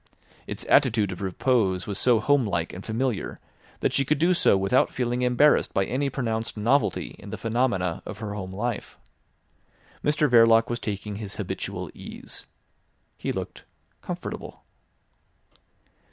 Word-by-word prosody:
Its - - -5
attitude 115 -8 +4
of 90 - -7
repose 95 -1 +1
was 100 -1 -3
so 120 -3 +4
home 140 +4 +3
like 85 -6 -2
and 95 - -8
familiar 115 -1 -2 0.4
that - - +1
she 140 - +3
could 150 +2 +1
do 170 +5 +3
so 170 - +4
without 95 +7 +2
feeling 125 0 -1
embarrassed 125 +4 +3
by 95 - +3
any 140 +5 -1
pronounced 115 -4 -3
novelty 120 +7 +1
in - - -10
the - - -5
phenomena 110 -7 0
of 110 - -7
her 105 -1 -5
home 95 -2 -5
life. 110 +3 -4 1.1
Mr 150 0 +3
Verloc 115 -2 +5
was 120 - -2
taking 105 -2 -4
his 105 -2 -6
habitual - - -4
ease. - - -8 0.7
He - - -3
looked - - -6 0.4
comfortable. - - -6
115 Hz, 145 wpm, -26 LUFS, 100-130 Hz, 1.1 s, Verloc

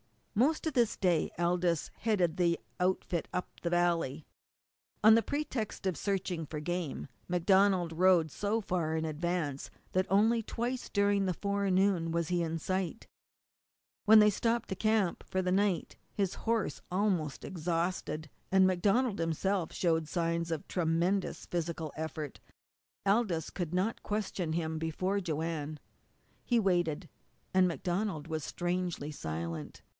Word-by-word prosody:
Most 285 +10 +2
of 315 - -1
this 240 -4 +2
day 175 -4 +2
Aldous 175 -1 +1
headed 185 -7 +1
the 170 -2 +3 0.2
outfit 180 -2 0
up 180 - -2
the 170 - -1
valley. 170 -4 +1 0.8
On 220 +1 +9
the 230 - +6
pretext 265 -8 -3
of 185 -2 +1
searching 185 -5 -2
for 150 - -5
game 170 -2 -3 0.2
MacDonald 185 0 +3
rode 175 -2 +4
so 210 +7 -1
far 170 -5 -1
in 160 0 -1
advance 155 -2 -2 0.2
that 185 0 +1
only 220 +4 +4
twice 240 +3 -3
during 200 -1 +2
the 185 -2 0
forenoon 195 -3 +1
was 170 0 -1
he 175 -1 +1
in 165 0 -1
sight. 185 +4 -2 1.0
When 220 +1 +8
they 210 0 +7
stopped 230 +3 0
to 190 - -2
camp 215 -3 +1
for 185 0 0
the 180 - 0
night 195 -2 +1 0.2
his 195 -3 0
horse 220 -11 -1
was - - -31
almost 180 -6 0
exhausted, 165 -2 -2 0.2
and 190 0 +6
MacDonald 200 +5 +2
himself 165 +2 0
showed 160 -3 +1
signs 170 0 -1
of 160 -3 -3
tremendous 175 +3 0
physical 165 -3 -3
effort. 155 -2 -5 0.7
Aldous 195 -6 +1
could 175 -2 -3
not 195 +5 0
question 200 -6 -2
him 160 -1 -1
before 185 +5 -1
Joanne. 160 -3 -3 0.7
He 240 -2 +2
waited. 175 -4 +1 0.5
And 185 -1 +5
MacDonald 175 -2 -2
was 160 -2 -3
strangely 175 -3 -2
silent. 80 - -5
180 Hz, 140 wpm, -32 LUFS, 165-200 Hz, 1.0 s, On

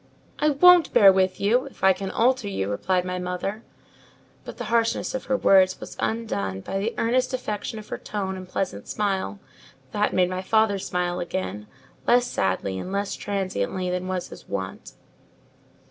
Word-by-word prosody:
"I 300 - +3
won't 355 +4 +6
bear 195 -2 +8
with 185 -1 +1
you, 240 +7 +2
if 275 - -15
I 190 0 +7
can 195 0 -5
alter 250 0 +2
you," 100 - -2
replied 180 - 0
my 180 0 -3
mother: 180 +4 -3 0.8
but - - -9
the - - -4
harshness 230 -1 +1
of 260 - -4
her 260 - +1
words 190 -4 +4
was - - -9
undone 100 - -2
by 195 - -3
the 220 +4 -2
earnest 255 +3 +1
affection 215 -3 -4
of 215 - -10
her - - -4
tone 195 -2 -4
and 185 -1 -9
pleasant 140 - -3
smile, 195 - -1 0.5
that 210 0 +1
made 180 -1 +2
my 185 0 -2
father 220 0 +2
smile 180 -1 -2
again, 105 - -4 0.4
less 245 0 +5
sadly 95 - -1
and 185 - -6
less 200 0 -1
transiently 185 - -2
than 180 0 -2
was 185 -1 -3
his - - -13
wont. 95 -1 -5
190 Hz, 175 wpm, -25 LUFS, 180-220 Hz, 0.8 s, bear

